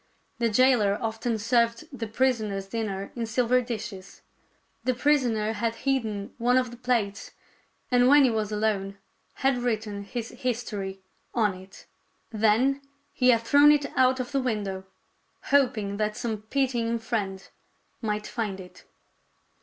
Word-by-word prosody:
The 235 Hz, -1 st, +2 dB
jailer 215 Hz, -3 st, +4 dB
often 225 Hz, +1 st, -2 dB
served 235 Hz, +5 st, +1 dB
the 230 Hz, -3 st, -4 dB
prisoner's 220 Hz, -4 st, 0 dB
dinner 200 Hz, -2 st, -4 dB
in 235 Hz, -2 st, -3 dB
silver 250 Hz, +2 st, +2 dB
dishes. 215 Hz, -5 st, -7 dB, 0.6 s
The 255 Hz, -1 st, +1 dB
prisoner 240 Hz, -6 st, +1 dB
had 225 Hz, +1 st, -1 dB
hidden 220 Hz, -7 st, -1 dB
one 245 Hz, +2 st, +3 dB
of 250 Hz, -2 st, +1 dB
the 240 Hz, -, -10 dB
plates, 235 Hz, -5 st, -1 dB, 0.6 s
and 245 Hz, 0 st, +5 dB
when 290 Hz, +1 st, +7 dB
he 255 Hz, -, +4 dB
was 215 Hz, -2 st, -1 dB
alone 205 Hz, -2 st, -1 dB, 0.5 s
had 270 Hz, -2 st, +3 dB
written 215 Hz, -4 st, -2 dB
his 230 Hz, +2 st, -5 dB
history 215 Hz, -6 st, -4 dB, 0.3 s
on 215 Hz, -4 st, +2 dB
it. 185 Hz, +1 st, -13 dB, 0.5 s
Then 225 Hz, +6 st, +2 dB, 0.3 s
he 255 Hz, -1 st, +3 dB
had 230 Hz, -2 st, +5 dB
thrown 285 Hz, +5 st, +6 dB
it 290 Hz, -1 st, 0 dB
out 260 Hz, 0 st, +3 dB
of 255 Hz, +2 st, -4 dB
the 275 Hz, -1 st, +1 dB
window, 205 Hz, -6 st, -3 dB, 0.7 s
hoping 240 Hz, -8 st, +2 dB
that 215 Hz, 0 st, -1 dB
some 220 Hz, -3 st, -3 dB
pitying 245 Hz, -4 st, 0 dB
friend 205 Hz, -4 st, -3 dB, 0.5 s
might 210 Hz, -2 st, -2 dB
find 210 Hz, -5 st, -3 dB
it. 180 Hz, -1 st, -13 dB
230 Hz, 140 wpm, -26 LUFS, 210-250 Hz, 0.7 s, when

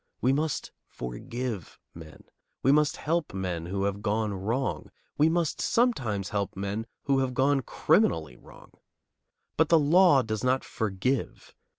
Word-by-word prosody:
We 130 Hz, +2 st, +2 dB
must 150 Hz, +1 st, -2 dB, 0.2 s
forgive 115 Hz, -, -6 dB, 0.2 s
men. 80 Hz, -2 st, -12 dB, 0.4 s
We 135 Hz, -, +5 dB
must 150 Hz, 0 st, +3 dB
help 160 Hz, -, -2 dB
men 90 Hz, -3 st, -3 dB
who 100 Hz, +2 st, -2 dB
have 100 Hz, 0 st, -2 dB
gone 105 Hz, 0 st, 0 dB
wrong. 115 Hz, +8 st, -2 dB, 0.3 s
We 150 Hz, +2 st, +4 dB
must 170 Hz, -2 st, 0 dB
sometimes 130 Hz, -, +1 dB
help 100 Hz, -1 st, -2 dB
men 100 Hz, +3 st, -3 dB, 0.2 s
who 135 Hz, -1 st, +2 dB
have 130 Hz, -1 st, -1 dB
gone 135 Hz, +1 st, +3 dB
criminally 80 Hz, -, +1 dB
wrong. -, -, -17 dB, 0.9 s
But 160 Hz, 0 st, +3 dB
the 165 Hz, -, +6 dB
law 155 Hz, -1 st, +5 dB
does 110 Hz, -2 st, -3 dB
not 130 Hz, +1 st, +2 dB
forgive. 110 Hz, +4 st, -3 dB
120 Hz, 145 wpm, -27 LUFS, 100-145 Hz, 0.9 s, the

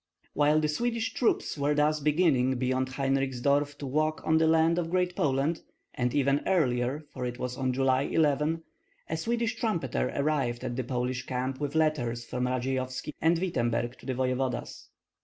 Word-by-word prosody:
While 150 Hz, +1 st, +3 dB
the 155 Hz, -, +1 dB
Swedish 225 Hz, +7 st, -1 dB
troops 230 Hz, -, 0 dB
were 145 Hz, +1 st, +1 dB
thus 150 Hz, +1 st, +2 dB
beginning 145 Hz, -4 st, +2 dB
beyond 130 Hz, +1 st, 0 dB
Heinrichsdorf 135 Hz, +1 st, 0 dB
to 145 Hz, -, -6 dB
walk 155 Hz, +3 st, -1 dB
on 160 Hz, 0 st, +3 dB
the 160 Hz, -, +3 dB
land 165 Hz, +1 st, +3 dB
of 165 Hz, -1 st, -2 dB
Great 180 Hz, 0 st, 0 dB
Poland, 140 Hz, +3 st, 0 dB, 0.3 s
and 125 Hz, 0 st, 0 dB
even 140 Hz, 0 st, +2 dB
earlier, 135 Hz, -5 st, +1 dB
for 130 Hz, -, -5 dB
it 125 Hz, 0 st, -3 dB
was 125 Hz, 0 st, -4 dB
on 130 Hz, 0 st, 0 dB
July 130 Hz, +1 st, +1 dB
18, 155 Hz, +1 st, +1 dB, 0.5 s
a -, -, +1 dB
Swedish 230 Hz, +5 st, -1 dB
trumpeter 160 Hz, -, -1 dB
arrived 140 Hz, -5 st, 0 dB
at 120 Hz, -, -3 dB
the 130 Hz, -, -2 dB
Polish 125 Hz, +1 st, -2 dB
camp 130 Hz, +1 st, -2 dB
with 145 Hz, +1 st, -3 dB
letters 125 Hz, -7 st, +1 dB
from 125 Hz, +1 st, -2 dB
Radzeyovski 130 Hz, +2 st, -2 dB
and 165 Hz, +1 st, +4 dB
Wittemberg 120 Hz, -9 st, -1 dB
to -, -, -13 dB
the 130 Hz, -, -1 dB
voevodas. 130 Hz, 0 st, -2 dB
140 Hz, 170 wpm, -28 LUFS, 125-155 Hz, 0.5 s, and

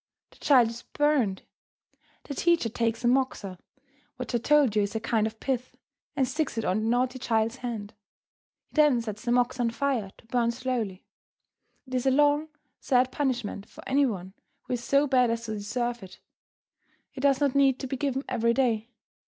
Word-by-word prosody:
The -, -, -20 dB
child 250 Hz, -5 st, +5 dB
is 235 Hz, +1 st, -8 dB
burned! 285 Hz, -10 st, 0 dB, 0.8 s
The 285 Hz, -, -6 dB
teacher 340 Hz, -5 st, +2 dB
takes 230 Hz, +1 st, -1 dB
a -, -, +2 dB
moxa, 240 Hz, -8 st, 0 dB, 0.6 s
which -, -, -6 dB
I 240 Hz, -, +2 dB
told 280 Hz, -3 st, +3 dB
you 210 Hz, -, +4 dB
is 200 Hz, +2 st, -2 dB
a -, -, +1 dB
kind 220 Hz, -1 st, +1 dB
of 220 Hz, 0 st, -9 dB
pith, 255 Hz, -2 st, -3 dB, 0.4 s
and 265 Hz, -2 st, +1 dB
sticks 300 Hz, -3 st, -2 dB
it 225 Hz, -, -1 dB
on 185 Hz, +3 st, +1 dB
the 215 Hz, -, -2 dB
naughty 250 Hz, +2 st, +1 dB
child's 225 Hz, 0 st, 0 dB
hand. 225 Hz, -5 st, -5 dB, 0.7 s
He -, -, -38 dB
then 295 Hz, -6 st, +4 dB
sets 215 Hz, -2 st, -6 dB
the 240 Hz, -, 0 dB
moxa 245 Hz, +1 st, +2 dB
on 235 Hz, -, +2 dB
fire 240 Hz, -4 st, -1 dB
to -, -, -20 dB
burn 235 Hz, 0 st, +1 dB
slowly. 235 Hz, -6 st, -3 dB, 0.8 s
It 260 Hz, -, -12 dB
is 255 Hz, +1 st, 0 dB
a -, -, +7 dB
long, 290 Hz, +3 st, +3 dB, 0.3 s
sad 255 Hz, -1 st, +2 dB
punishment 245 Hz, -8 st, -2 dB
for -, -, -12 dB
any 275 Hz, +1 st, +3 dB
one 190 Hz, -4 st, -5 dB, 0.3 s
who -, -, -4 dB
is 240 Hz, -1 st, -3 dB
so 280 Hz, +3 st, +3 dB
bad 255 Hz, -3 st, +3 dB
as 230 Hz, 0 st, -2 dB
to 220 Hz, -, -5 dB
deserve 240 Hz, +3 st, -3 dB
it. 190 Hz, 0 st, -12 dB, 0.9 s
It -, -, -8 dB
does 275 Hz, -1 st, +3 dB
not 280 Hz, -3 st, +2 dB
need 270 Hz, -2 st, +3 dB
to -, -, -3 dB
be 265 Hz, -, -3 dB
given 270 Hz, 0 st, -1 dB
every 235 Hz, -2 st, +1 dB
day. 230 Hz, -4 st, +1 dB
245 Hz, 195 wpm, -27 LUFS, 225-270 Hz, 0.9 s, a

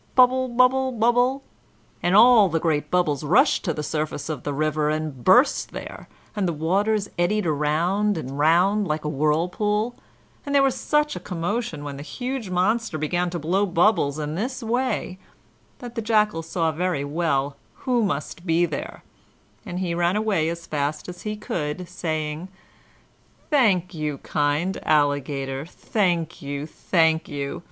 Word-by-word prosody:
Bubble, 255 Hz, 0 st, +5 dB
bubble, 255 Hz, +2 st, +3 dB
bubble!" 245 Hz, +3 st, +2 dB, 0.6 s
and 175 Hz, +2 st, +2 dB
all 220 Hz, -2 st, +7 dB
the 165 Hz, 0 st, 0 dB
great 150 Hz, -3 st, 0 dB
bubbles 160 Hz, -5 st, +1 dB
rushed 215 Hz, -, +3 dB
to 170 Hz, -, +1 dB
the 150 Hz, -, -4 dB
surface 150 Hz, 0 st, -3 dB
of 150 Hz, -5 st, -4 dB
the 145 Hz, -, -3 dB
river 150 Hz, +1 st, 0 dB
and 155 Hz, -5 st, -3 dB
burst 250 Hz, +9 st, +4 dB
there, -, -, -8 dB, 0.3 s
and 200 Hz, -3 st, 0 dB
the 170 Hz, -, -1 dB
waters 200 Hz, +7 st, 0 dB
eddied 205 Hz, +3 st, +1 dB
round 170 Hz, +7 st, +1 dB
and 140 Hz, -2 st, -5 dB
round 185 Hz, +7 st, +3 dB
like 155 Hz, 0 st, -2 dB
a -, -, 0 dB
whirlpool; 180 Hz, -, 0 dB, 0.5 s
and 285 Hz, -1 st, -2 dB
there 275 Hz, -, +6 dB
was 270 Hz, -2 st, +3 dB
such 300 Hz, -1 st, 0 dB
a -, -, -4 dB
commotion 175 Hz, -2 st, -3 dB
when 140 Hz, -1 st, -6 dB
the -, -, -7 dB
huge 245 Hz, -, -5 dB
monster 190 Hz, +1 st, 0 dB
began 175 Hz, +4 st, -1 dB
to 175 Hz, -, -4 dB
blow 175 Hz, +6 st, 0 dB
bubbles 175 Hz, -5 st, +2 dB
in 150 Hz, 0 st, -3 dB
this 240 Hz, +8 st, -3 dB
way 230 Hz, -5 st, -1 dB, 0.6 s
that 240 Hz, -1 st, -9 dB
the 230 Hz, -, -3 dB
Jackal 210 Hz, -5 st, +2 dB
saw 165 Hz, 0 st, -1 dB
very 170 Hz, -2 st, -1 dB
well 145 Hz, -3 st, -1 dB, 0.3 s
who 250 Hz, -3 st, +2 dB
must 170 Hz, -2 st, -3 dB
be 170 Hz, -1 st, +2 dB
there, 155 Hz, -4 st, -6 dB, 0.6 s
and 175 Hz, -, -5 dB
he 180 Hz, -2 st, -1 dB
ran 175 Hz, +2 st, +1 dB
away 210 Hz, -7 st, +1 dB
as 170 Hz, 0 st, -6 dB
fast 150 Hz, +2 st, -3 dB
as 175 Hz, -, -9 dB
he 215 Hz, 0 st, -3 dB
could, 175 Hz, -4 st, -4 dB
saying, 155 Hz, -1 st, -3 dB, 1.0 s
"Thank 195 Hz, -, +3 dB
you, 150 Hz, -3 st, -3 dB
kind 150 Hz, +7 st, -1 dB
Alligator, 140 Hz, -2 st, 0 dB
thank 175 Hz, -1 st, -1 dB
you; 140 Hz, +1 st, -4 dB
thank 160 Hz, 0 st, +1 dB
you! 140 Hz, -1 st, -4 dB
175 Hz, 160 wpm, -24 LUFS, 150-215 Hz, 1.0 s, all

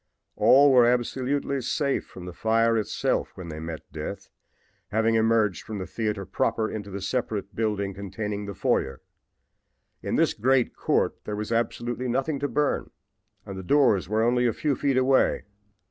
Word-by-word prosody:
All 135 Hz, +7 st, +6 dB
were 125 Hz, -2 st, +6 dB
absolutely 130 Hz, +3 st, 0 dB
safe 140 Hz, +3 st, -1 dB
from 90 Hz, -, -11 dB
the 90 Hz, -, -7 dB
fire 115 Hz, +3 st, +2 dB
itself 110 Hz, -2 st, -1 dB
when 90 Hz, -2 st, -8 dB
they 80 Hz, -1 st, -6 dB
met 80 Hz, 0 st, -6 dB
death, -, -, -6 dB, 0.6 s
having 110 Hz, +2 st, +1 dB
emerged 110 Hz, -4 st, +2 dB
from 110 Hz, -, -7 dB
the 95 Hz, -, -4 dB
theater 105 Hz, -3 st, -3 dB
proper 115 Hz, -2 st, 0 dB
into 105 Hz, -2 st, -6 dB
the 100 Hz, 0 st, -6 dB
separate 105 Hz, -2 st, -3 dB
building 105 Hz, -3 st, -1 dB
containing 100 Hz, +1 st, -5 dB
the 100 Hz, -, -6 dB
foyer. 65 Hz, -4 st, -1 dB, 1.0 s
In -, -, -2 dB
this -, -, +3 dB
great 130 Hz, +2 st, +1 dB
court -, -, 0 dB
there 105 Hz, -, -3 dB
was 105 Hz, +2 st, -4 dB
absolutely 120 Hz, +2 st, -1 dB
nothing 135 Hz, +4 st, -1 dB
to 145 Hz, -, -1 dB
burn 145 Hz, +3 st, 0 dB, 0.6 s
and 95 Hz, -1 st, -7 dB
the -, -, -5 dB
doors 115 Hz, -5 st, +3 dB
were 110 Hz, +1 st, +1 dB
only 125 Hz, +1 st, +2 dB
a 115 Hz, -, +1 dB
few 145 Hz, +3 st, 0 dB
feet 135 Hz, 0 st, 0 dB
away. 130 Hz, +1 st, +3 dB
115 Hz, 165 wpm, -26 LUFS, 100-130 Hz, 1.0 s, All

